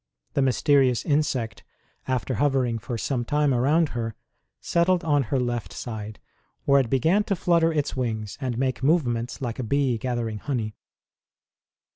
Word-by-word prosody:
The - - +1
mysterious 135 -1 +3
insect, 135 -7 0 0.4
after 130 0 -1
hovering 125 -2 +1
for 120 +2 -4
some 125 +1 -1
time 145 +2 +1
around 145 +6 +3
her, 115 -4 -4 0.4
settled 175 +1 +2
on 145 -3 +3
her 135 - +1
left 120 -2 -2
side, 110 -3 -6 0.5
where 140 0 +5
it 130 -4 0
began 160 - +3
to 200 - 0
flutter 170 -2 +3
its 150 -2 -1
wings 110 -5 -3
and 125 -3 -2
make 130 0 -1
movements 130 -5 0
like 120 -1 -3
a - - -1
bee 130 -1 +1
gathering 115 -3 -2
honey. 115 -4 -3
130 Hz, 150 wpm, -25 LUFS, 120-145 Hz, 0.5 s, where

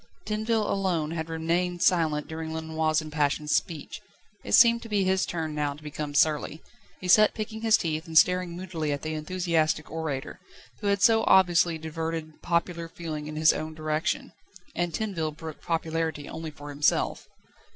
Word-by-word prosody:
Tinville 215 +1 0
alone 175 -6 0
had 160 -1 -4
remained 170 +2 -1
silent 160 -5 +2
during 160 0 -5
Lenoir's 160 0 0
impassioned 150 -1 -1
speech. 155 -1 -2 0.4
It - - -5
seemed 235 0 +7
to 230 - -10
be 205 -2 +2
his 190 0 +1
turn 160 -3 -3
now 145 -1 -1
to 150 - -16
become 150 -1 -5
surly. 150 +1 +1 0.4
He 185 - -6
sat 215 +4 +6
picking 220 0 -5
his 225 -1 +5
teeth, 160 0 -3
and 160 -1 0
staring 180 0 +4
moodily 170 -4 -3
at 145 -1 -3
the 155 0 -3
enthusiastic 160 -1 0
orator, 155 -4 -4 0.4
who 210 - -3
had 200 -1 +1
so 225 -1 +5
obviously 175 -3 +4
diverted 160 0 -5
popular 170 0 -1
feeling 155 -3 -6
in 155 - -6
his 155 0 +5
own 155 0 -5
direction. 155 0 -2 0.4
And 175 0 -1
Tinville 165 -6 -3
brooked 160 -2 -8
popularity 160 -2 -2
only 160 0 -6
for 145 -1 -10
himself. 145 +1 0
160 Hz, 165 wpm, -27 LUFS, 155-180 Hz, 0.4 s, seemed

